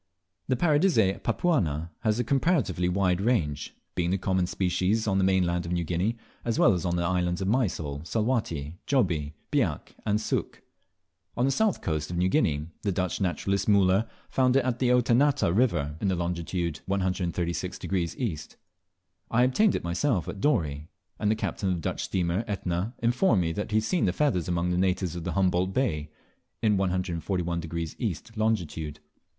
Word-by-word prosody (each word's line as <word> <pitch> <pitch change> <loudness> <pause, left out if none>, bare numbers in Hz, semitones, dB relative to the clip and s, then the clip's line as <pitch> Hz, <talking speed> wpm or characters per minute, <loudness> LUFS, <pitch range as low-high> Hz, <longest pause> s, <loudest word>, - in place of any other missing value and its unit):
The 130 - +2
Paradisea 145 - +3
papuana 85 - 0
has 110 -1 0
a - - +2
comparatively 135 - +1
wide 90 0 +1
range, 85 - 0 0.2
being 85 -1 0
the 95 - +1
common 95 -1 0
species 95 +4 0
on 95 -2 +1
the - - +2
mainland 90 -2 +1
of - - -4
New 85 -1 0
Guinea, 90 +8 -1 0.3
as 115 -1 -1
well - - +5
as 90 -2 -2
on 85 -1 0
the 85 - 0
islands 90 0 0
of 95 - -2
Mysol, 85 - 0
Salwatty, 90 - -1
Jobie, 85 - +1 0.2
Biak 115 - 0
and 105 -1 +1
Sook. 110 - -3 0.7
On 120 - +2
the 135 - +2
south 215 +7 +1
coast 75 -2 -2
of 85 - -3
New 90 +1 +2
Guinea, 75 -5 +1 0.2
the 100 - 0
Dutch 90 +1 -2
naturalist, 95 +2 0
Muller, 100 +2 +4 0.2
found 130 -1 +2
it 135 -2 +3
at 125 -1 -1
the 125 - +2
Oetanata 125 -4 +3
river 85 - +1
in 100 - +1
longitude 85 -2 -2
136° 90 -1 -1
E. 85 - -4 0.7
I 120 +2 +3
obtained 190 +12 +3
it - - -2
myself 90 - 0
at 100 - -6
Dorey; 75 - 0 0.3
and 105 - +1
the 110 - +3
captain 100 -2 -2
of 90 - +1
the 85 - -5
Dutch - - -2
steamer 90 +2 0
Etna 95 +2 -2
informed 120 - +3
me 80 - -1
that 105 +5 -3
he 110 - +1
had 110 - +2
seen 175 +9 +1
the 90 - +1
feathers 115 - +1
among 90 0 0
the 90 - +1
natives 90 -2 0
of 85 0 -5
Humboldt 95 0 +1
Bay, 75 - 0 0.5
in 105 -2 +4
141° 85 -3 -2
E. 110 -9 0 0.2
longitude. 85 -9 -1
95 Hz, 170 wpm, -27 LUFS, 85-115 Hz, 0.7 s, well